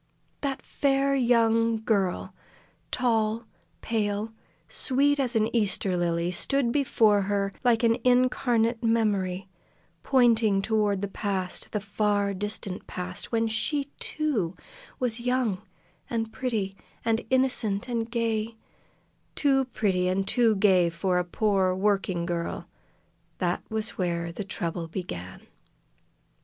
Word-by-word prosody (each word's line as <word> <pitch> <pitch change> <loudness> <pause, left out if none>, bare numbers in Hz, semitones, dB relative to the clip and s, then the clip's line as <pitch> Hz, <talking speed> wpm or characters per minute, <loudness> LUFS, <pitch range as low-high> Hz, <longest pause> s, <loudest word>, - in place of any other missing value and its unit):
That 275 -2 -3
fair 275 -1 +1
young 230 -3 +3
girl 195 -5 0 0.6
tall, 225 -2 0 0.4
pale, 215 -1 -1 0.3
sweet 285 +2 +1
as 255 -3 +1
an 225 +2 +1
Easter 200 -4 +1
lily 170 0 0
stood 245 +7 +1
before 225 -7 +3
her 200 -1 0
like 240 -2 +3
an 230 0 +4
incarnate 245 -2 +2
memory, 200 -5 +1 0.5
pointing 225 - +3
toward 210 -3 +1
the - - 0
past, 190 -2 -3
the 210 - -1
far 205 -1 0
distant 195 -1 -4
past, 180 0 -6
when 230 -1 +1
she, 275 +6 -1
too, 235 - -1 0.4
was 240 -2 +1
young, 240 -5 0 0.5
and 225 -2 -2
pretty, 215 -7 -2 0.3
and 225 0 +2
innocent, 250 -5 +1
and 230 -2 -2
gay 230 -1 -1 0.8
too 270 -2 +3
pretty 190 -7 0
and 190 +1 0
too 230 0 +3
gay 190 -4 +4
for 180 +2 0
a - - +1
poor 190 0 +1
working 190 -3 0
girl! 170 -1 -3 0.7
That - - -1
was 220 -2 -2
where 170 -2 -1
the 195 +4 -6
trouble 170 -2 -3
began. 95 - -6
215 Hz, 120 wpm, -27 LUFS, 190-235 Hz, 0.8 s, an